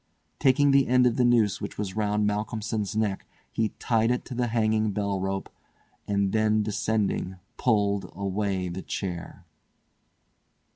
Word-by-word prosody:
Taking 140 +1 +4
the 135 -1 +4
end 125 0 +4
of 120 -2 +2
the 125 - +3
noose 115 -5 +3
which - - -6
was 100 -2 -4
round 105 -1 +1
Malcolmson's 105 0 -2
neck 105 -3 -1 0.2
he 110 -1 0
tied 115 -1 +1
it 125 0 0
to - - -7
the 120 0 0
hanging 110 -2 +1
bell 100 -2 -1
rope, 95 +1 -2 0.6
and 100 -1 +1
then 110 -1 +2
descending 105 -2 -1 0.2
pulled 100 -4 +1
away 100 -1 -1
the 90 +2 -5
chair. 90 -4 -5
105 Hz, 145 wpm, -27 LUFS, 100-115 Hz, 0.6 s, Taking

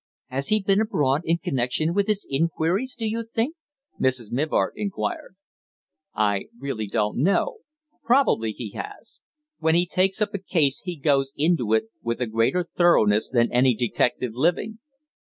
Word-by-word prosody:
"Has 135 +2 -2
he 215 - +3
been 195 +2 +3
abroad 145 -10 +1
in 165 +1 +2
connection 135 +3 -1
with 200 +1 +1
his 210 -2 0
inquiries, 165 - 0
do 225 - -3
you 225 +1 -2
think?" 230 +7 -2 0.4
Mrs. 130 -4 0
Mivart 150 +6 0
inquired. 215 - -4 0.8
"I 105 -2 +1
really 130 -6 -4
don't 105 +3 -1
know. 200 - +1 0.4
Probably 235 - +3
he 110 -1 -7
has. 225 - -9 0.4
When 160 0 +2
he 175 +1 +3
takes 190 +2 0
up 210 -1 0
a 200 - -2
case 155 -7 +1
he 180 -1 -5
goes 135 -2 +1
into 145 -8 +2
it 110 - +2 0.2
with 115 +1 -2
a 125 - 0
greater 115 +11 +1
thoroughness 110 - +4
than 120 -2 +2
any 125 0 +3
detective 120 +1 0
living." 175 - 0
155 Hz, 160 wpm, -24 LUFS, 125-195 Hz, 0.8 s, thoroughness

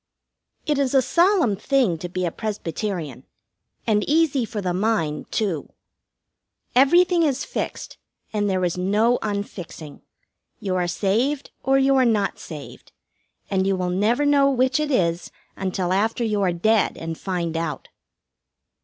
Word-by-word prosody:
It 295 -2 +1
is 275 -1 +1
a 265 - +6
solemn 340 - +3
thing 220 - +1
to 175 - -5
be 185 +1 -2
a 170 - -1
Presbyterian, 175 - -4 0.6
and 210 -2 +2
easy 295 -5 +2
for 215 - -5
the 185 -3 -1
mind, 180 -7 -1
too. 190 -9 -2 1.1
Everything 345 +7 +5
is 280 -5 +1
fixed, - - -5 0.3
and 205 -1 0
there 185 -1 +1
is 175 +1 -2
no 215 +6 +2
unfixing. 190 -7 -6 0.6
You 190 -2 -2
are 180 -1 0
saved 235 +11 0
or 270 0 +3
you 270 0 +3
are 260 - +5
not 210 -4 +1
saved, 150 -4 -10 0.6
and 190 -1 +1
you 195 - +2
will 180 -1 -2
never 220 +10 +1
know 285 -1 +4
which 260 +1 +2
it 305 -1 -1
is 175 - 0 0.3
until 185 -1 -2
after 220 +5 0
you 210 -3 0
are 185 -2 +2
dead 215 +5 +1
and 165 0 -5
find 170 -2 -3
out. 165 -1 -4
205 Hz, 150 wpm, -23 LUFS, 180-260 Hz, 1.1 s, a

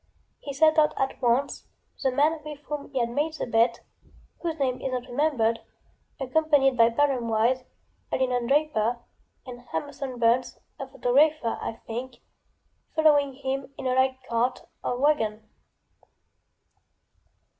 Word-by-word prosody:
He 285 - -6
set 310 +3 +4
out 300 - +3
at 270 0 -2
once, 250 +3 0 0.3
the 270 - +2
man 300 +5 +2
with 300 -1 -7
whom 295 -1 -6
he 270 - -5
had 235 -1 0
made 300 +5 -1
the - - -3
betŌĆöwhose 235 +7 -2
name 260 -3 -1
is 265 - -3
not 250 -1 -2
rememberedŌĆöaccompanied 270 +2 0
by 230 -1 +5
Barham 255 -1 +1
Wise, 235 +4 +2 0.5
a - - +1
linen 250 -2 0
draper, 260 -5 +1 0.5
and 245 -2 -9
Hamerson 275 -3 -5
Burns, 235 +2 +2 0.2
a 270 - -5
photographer, 270 0 +2
I - - -3
think, 245 +3 -5 0.8
following 290 -4 +4
in 270 0 -5
a 255 - +1
light 260 0 +2
cart 240 +2 -1 0.2
or 245 - -1
wagon. 220 -7 +1
260 Hz, 130 wpm, -26 LUFS, 240-290 Hz, 0.8 s, by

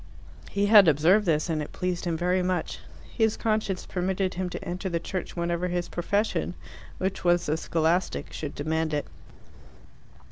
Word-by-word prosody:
He 200 0 +1
had 205 -3 +8
observed 170 +7 +4
this, 155 -1 +2
and 160 -2 -1
it 150 - -6
pleased 180 0 -2
him 170 -2 -1
very 180 +2 +1
much. 180 -2 -2 0.4
His 220 -2 +2
conscience 215 -4 -1
permitted 185 +1 -1
him 185 0 -3
to 195 - -7
enter 180 +2 -3
the 170 -1 -1
Church 185 +2 -5
whenever 170 +1 -1
his 175 -1 -2
profession, 200 +5 -1 0.4
which 190 +1 -2
was 175 0 +3
the 150 - +1
scholastic, 165 +2 0
should 150 -2 -5
demand 160 +1 -1
it. 145 - -1
180 Hz, 165 wpm, -27 LUFS, 165-190 Hz, 0.4 s, had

